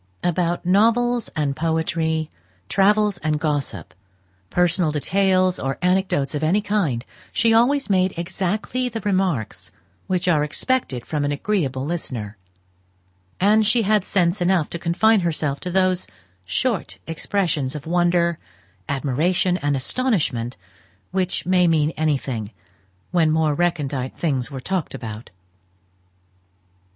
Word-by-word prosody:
About 175 0 0
novels 230 +5 +3
and 145 -3 0
poetry, 160 0 -1 0.4
travels 205 -1 +3
and 155 -1 -1
gossip, 145 - -2 0.6
personal 175 -2 +2
details, 185 +4 +2
or 135 0 -2
anecdotes 180 -6 +1
of 150 - -2
any 165 +6 +3
kind, 195 - -1 0.3
she 230 -1 +3
always 275 +5 +3
made 185 -2 +2
exactly 195 +8 -2
the 225 -1 -5
remarks 145 - -1 0.4
which 185 0 -1
are 155 -4 +3
expected 150 - -1
from 150 -2 -2
an 145 - 0
agreeable 140 -5 -1
listener; 125 -10 -4 1.0
and 210 +2 +4
she 230 +1 +3
had 210 -1 +2
sense 180 -1 +1
enough 175 -3 +2
to 170 - -4
confine 205 +7 +3
herself 155 -5 -1
to 180 - -5
those 185 0 +1 0.4
short 220 - -1
expressions 165 -5 -1
of 150 - -7
wonder, 175 0 +2 0.5
admiration, 155 +7 +1
and 145 -4 0
astonishment, 135 - -1 0.5
which 185 -1 -1
may 180 -1 +3
mean 155 -2 +2
anything, 135 -9 -2 0.6
when 170 -3 +3
more 155 -1 +2
recondite 145 -6 -1
things 135 -7 -1
were 135 -2 -6
talked 180 +4 -3
about. 110 -1 -7
170 Hz, 120 wpm, -22 LUFS, 145-190 Hz, 1.0 s, and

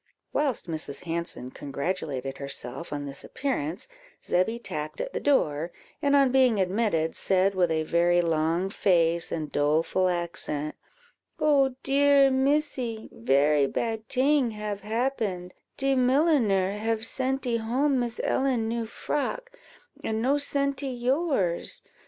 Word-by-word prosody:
Whilst 275 -10 0
Mrs. 155 -2 -4
Hanson 170 -6 -4
congratulated 140 -2 -4
herself 140 +3 -6
on 145 -1 -3
this 140 -1 -5
appearance, 195 - -3 0.4
Zebby 185 +6 +1
tapped 155 -9 -5
at - - -4
the - - -1
door, 165 - +1 0.3
and, 285 -2 +3
on 275 -2 +5
being 255 -5 +4
admitted, 185 -4 0
said, 190 +1 +2
with 180 -2 +2
a 160 -1 0
very 175 +2 +3
long 165 +2 +1
face 170 -4 +2
and 155 -3 -3
doleful 160 +5 +2
accent 170 -4 -3 0.7
"Oh 275 -4 +3
dear, 280 0 +5
Missy, 265 -4 0
very 140 +4 +3
bad 225 +6 -3
ting 275 0 +3
have 210 -1 -4
happened; 215 -6 -2 0.2
de 270 0 +1
milliner 250 - +3
have 220 +2 -1
sentee 260 0 -1
home 255 +5 +1
Miss 240 -1 -3
Ellen 255 -4 +1
new 230 0 -2
frock, 295 - -3 0.5
and 220 0 -1
no 265 +5 +2
sentee 280 -1 -1
yours. 255 - 0
215 Hz, 130 wpm, -27 LUFS, 165-265 Hz, 0.7 s, on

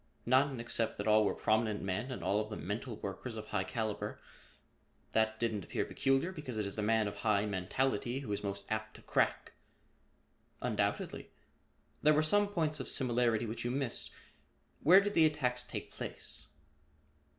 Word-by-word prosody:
"None 130 +1 +3
except 115 -1 -1
that 100 - -3
all 110 0 +6
were - - +1
prominent 110 -1 +1
men 95 +6 -2
and 115 -9 -5
all 100 +3 +2
of 105 0 -3
them 105 - -6
mental 110 +5 -3
workers 105 +4 -6
of 110 0 -7
high 95 - 0
caliber. 110 +2 -3 0.9
That 110 0 +1
didn't 110 -4 -1
appear - - -2
peculiar 135 +6 +1
because 145 -9 -6
it 105 - 0
is 100 - -2
the 110 - -2
man 110 0 +2
of 100 - -6
high 105 -2 +2
mentality 120 +6 -1
who 125 - -6
is 100 - -2
most 100 0 -3
apt 110 0 -2
to - - -13
crack." - - +1 1.1
"Undoubtedly. - - -1 0.7
There 150 0 +5
were 155 - +4
some 205 +6 +4
points 160 -6 0
of - - -4
similarity 120 -3 +2
which 115 +1 -4
you 120 - -1
missed. 130 -1 -1 0.7
Where 185 +6 +8
did 205 +1 -1
the 160 -4 +6
attacks 125 -5 0
take 125 - -6
place?" - - -3
115 Hz, 175 wpm, -33 LUFS, 105-135 Hz, 1.1 s, Where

